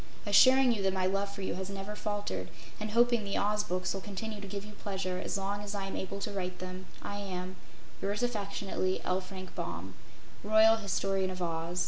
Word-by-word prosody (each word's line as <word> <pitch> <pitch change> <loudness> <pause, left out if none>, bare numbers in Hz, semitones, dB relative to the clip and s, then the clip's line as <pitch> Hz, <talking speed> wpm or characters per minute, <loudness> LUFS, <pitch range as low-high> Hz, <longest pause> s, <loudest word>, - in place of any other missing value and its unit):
Assuring 255 +5 +7
you 220 -4 0
that 190 -1 +2
my 185 -1 +2
love 195 +1 +1
for 200 -1 -6
you - - -1
has 190 +1 -4
never 200 +1 -5
faltered 205 - -2 0.3
and 215 0 -2
hoping 235 0 +4
the 200 -1 -1
Oz 210 +1 +2
Books 185 -2 -1
will 195 - -4
continue 210 +1 -5
to 200 - -6
give 200 +1 -4
you 210 - -9
pleasure 190 -3 -3
as - - -1
long 200 +1 -2
as 205 0 -4
I 195 -1 -2
am 195 - -4
able 195 +1 -3
to 210 - -2
write 185 -2 -3
them, 185 0 -6 0.2
I 205 - -3
am 185 -2 -4 0.5
Yours 205 +4 0
affectionately, 200 -4 0
L. 185 +1 +1
FRANK 185 0 -8
BAUM, 85 +3 -4 0.5
"Royal 220 +2 +7
Historian 195 -2 0
of 185 0 -5
Oz." 165 +1 -2
195 Hz, 205 wpm, -32 LUFS, 185-210 Hz, 0.5 s, Assuring